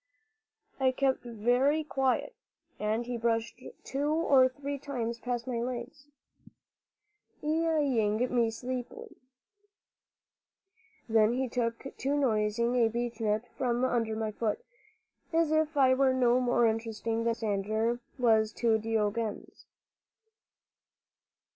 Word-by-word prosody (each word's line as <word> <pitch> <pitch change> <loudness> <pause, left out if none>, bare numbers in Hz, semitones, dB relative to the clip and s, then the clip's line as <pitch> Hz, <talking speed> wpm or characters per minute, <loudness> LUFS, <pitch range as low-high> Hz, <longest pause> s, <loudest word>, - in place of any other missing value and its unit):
I 260 -1 +3
kept 265 0 +1
very 245 +6 +1
quiet, 270 -3 0 0.5
and 215 +3 -1
he 245 0 -3
brushed 230 +1 -1 0.2
two 285 +2 -2
or 285 -5 +4
three 280 +2 -5
times 235 -5 -4
past 240 -1 -3
my 250 -3 -2
legs, 255 +4 -6 1.4
eyeing 295 -9 +1 0.2
me 235 -2 +3
sleepily. 255 - -6 1.9
Then 220 0 +4
he 260 +1 -1
took 240 +2 -3
to 275 +2 -1
nosing 235 -2 +1
a 230 -2 +4
beechnut 225 -1 -2
from 245 -1 0
under 230 -3 0
my 220 -1 -2
foot, 230 - -2 0.7
as 325 -2 +2
if 315 -1 +1
I 260 -2 +5
were 260 0 +3
no 250 -1 +3
more 245 -1 +2
interesting 225 0 -1
than 230 - -1
Alexander 220 +2 -1 0.2
was 220 -3 +3
to 225 -2 +2
Diogenes. 220 0 -3
240 Hz, 110 wpm, -30 LUFS, 225-265 Hz, 1.9 s, I